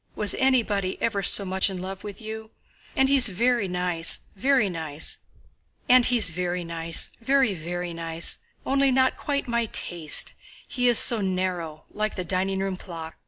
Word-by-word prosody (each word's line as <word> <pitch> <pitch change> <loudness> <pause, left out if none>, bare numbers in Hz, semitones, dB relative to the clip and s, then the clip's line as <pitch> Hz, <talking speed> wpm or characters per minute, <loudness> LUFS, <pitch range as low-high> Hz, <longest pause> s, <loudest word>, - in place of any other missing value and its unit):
Was 210 - +2
anybody 225 -8 0
ever 230 -3 -1
so 200 +1 +4
much 190 +1 0
in 190 -2 -6
love 190 +1 -7
with 205 0 -8
you? 220 0 -8 0.5
And 265 - +4
he's 270 -4 +5
very 235 +2 0
nice, 180 -2 +2
very, 260 +1 +2 1.6
very 180 +1 -3
nice. 165 0 0 1.5
Only 275 0 +2
not 260 0 +2
quite 280 -2 -3
my 235 -1 0
taste—he 175 +8 -1
is 240 -2 +5
so 230 -3 +4
narrow, 180 -5 -3
like 215 0 -3
the 185 - -4
dining 190 +2 -1
room 195 -1 -3
clock.... 165 -3 -9
195 Hz, 130 wpm, -24 LUFS, 180-235 Hz, 1.6 s, he's